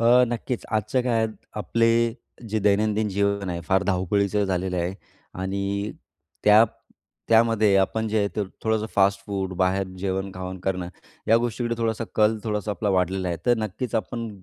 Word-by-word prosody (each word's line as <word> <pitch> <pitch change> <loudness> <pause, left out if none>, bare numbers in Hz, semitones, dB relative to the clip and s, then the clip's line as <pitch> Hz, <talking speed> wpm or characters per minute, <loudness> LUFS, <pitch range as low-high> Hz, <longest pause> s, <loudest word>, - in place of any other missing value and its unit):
अ, 120 +2 +6
नक्कीच, 120 +1 -3
आजच्या 110 +4 +1
काळात 115 -3 +1 0.3
आपले, 115 +2 +2 0.6
जे 110 - 0
दैनंदिन 105 +1 +2
जीवन 100 -1 0
आहे 85 -1 -3
फार 95 0 +3
धावपळीचं 100 +2 +1
झालेलं 90 -1 -1
आहे. 90 +2 -1 0.4
आणि 100 +2 -2 0.5
त्या 105 +2 +8 0.6
त्यामध्ये 110 -3 +4
आपण 110 +3 +1
जे 110 - +1
आहे 100 -1 +1
ते 105 - +1 0.2
थोडंसं 110 -1 0
फास्ट-फूड, 100 -1 +1
बाहेर 95 +1 +1
जेवण-खावण 95 -1 -3
करणं. 90 -2 -2 0.4
या 115 - +6
गोष्टीकडे 120 0 -1
थोडासा 115 0 -1
कल 110 +1 +3
थोडासा 105 -1 -2
आपला 105 +1 -2
वाढलेला 95 0 +1
आहे, 85 - -2
तर 120 -1 +4
नक्कीच 110 +3 -4
आपण, 115 +2 -2
100 Hz, 150 wpm, -24 LUFS, 95-110 Hz, 0.6 s, त्या